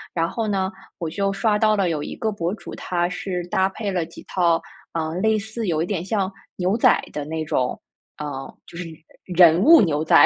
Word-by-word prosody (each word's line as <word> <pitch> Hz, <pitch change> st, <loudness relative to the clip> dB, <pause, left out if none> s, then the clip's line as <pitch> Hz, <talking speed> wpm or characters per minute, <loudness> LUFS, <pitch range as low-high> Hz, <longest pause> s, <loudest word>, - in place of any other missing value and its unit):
然 165 Hz, -1 st, +2 dB
后 225 Hz, -2 st, -2 dB
呢， 190 Hz, -2 st, 0 dB, 0.3 s
我 170 Hz, -, -3 dB
就 195 Hz, +4 st, 0 dB
刷 210 Hz, +1 st, +1 dB
到 215 Hz, 0 st, +4 dB
了 195 Hz, -4 st, +1 dB
有 155 Hz, -3 st, -1 dB
一 -, -, -6 dB
个 220 Hz, -1 st, -1 dB
博 170 Hz, -3 st, -2 dB
主， 205 Hz, -, -10 dB
他 175 Hz, -1 st, -1 dB
是 180 Hz, -2 st, -4 dB
搭 190 Hz, +1 st, +2 dB
配 200 Hz, +1 st, -4 dB
了 180 Hz, -3 st, 0 dB
几 165 Hz, -, -13 dB
套， 170 Hz, -3 st, +2 dB, 0.3 s
呃， 160 Hz, -1 st, -2 dB
类 220 Hz, +2 st, +3 dB
似 220 Hz, +1 st, -4 dB
有 160 Hz, -2 st, +1 dB
一 -, -, +1 dB
点 180 Hz, -2 st, -2 dB
像 195 Hz, -1 st, -1 dB, 0.3 s
牛 185 Hz, +3 st, +1 dB
仔 -, -, +5 dB
的 150 Hz, -, -3 dB
那 160 Hz, +1 st, -3 dB
种 125 Hz, -4 st, -1 dB, 0.4 s
嗯， 140 Hz, -2 st, -5 dB
就 -, -, -14 dB
是 175 Hz, -, -4 dB, 0.5 s
人 170 Hz, -1 st, +7 dB
物 325 Hz, +5 st, +9 dB
牛 155 Hz, -4 st, +1 dB
仔， -, -, +7 dB
180 Hz, 230 characters per minute, -23 LUFS, 165-205 Hz, 0.5 s, 物